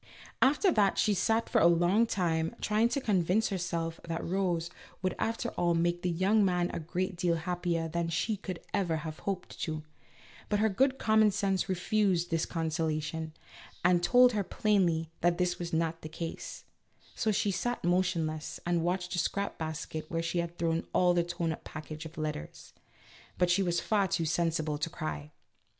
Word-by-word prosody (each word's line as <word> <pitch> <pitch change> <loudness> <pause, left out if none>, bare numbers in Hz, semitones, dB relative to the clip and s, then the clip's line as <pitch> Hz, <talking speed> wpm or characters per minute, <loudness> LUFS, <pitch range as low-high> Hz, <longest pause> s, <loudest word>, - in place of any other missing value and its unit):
After 295 +9 +4
that 205 - +3
she 210 - +3
sat 225 +4 +1
for - - +2
a 170 - +7
long 175 +7 +4
time 165 -5 0
trying 215 +2 +2
to 280 - 0
convince 200 -2 +2
herself 170 -4 -2
that 165 0 -3
Rose 175 -2 0 0.3
would 185 - +1
after 230 +1 -1
all 175 -4 +1
make 175 +1 +1
the 180 - 0
young 190 +5 +3
man 180 -2 +1
a - - -2
great 180 +4 -2
deal 175 -1 +1
happier 170 0 -1
than 170 +1 -2
she 190 +6 0
could 185 -3 -6
ever 180 -5 +1
have 155 -1 -6
hoped 190 -2 -5
to; 155 -1 -3 0.7
but 210 - +2
her 220 +1 +3
good 265 +7 +2
common 220 -2 +4
sense 195 -2 0
refused 185 -1 +1
this 165 -1 +1
consolation, 160 -1 -2 0.5
and 180 -1 +5
told 245 +7 +6
her 210 -3 0
plainly 175 -5 +1
that 175 0 +3
this 180 0 0
was 170 -1 -4
not 165 0 -1
the 155 - -7
case; 165 +1 -6 0.5
so 220 - 0
she 205 0 +1
sat 240 +6 -2
motionless, 170 -3 0
and 175 -1 +1
watched 180 +1 -1
the 180 - 0
scrap 200 +3 -2
basket 160 0 -5
where 165 0 -1
she 170 +1 -1
had 170 0 -3
thrown 165 -1 0 0.3
the 175 -1 +2
torn 170 -1 -2
up 160 - -6
package 155 +1 -7
of 160 - -16
letters; 150 - -5 0.6
but 180 -1 +3
she 190 +3 +3
was 175 -2 +1
far 205 -3 +1
too 165 -2 0
sen 170 +1 +1
sible 155 -2 -2
to 155 - -1
cry. 155 -2 -5
175 Hz, 180 wpm, -30 LUFS, 165-195 Hz, 0.7 s, a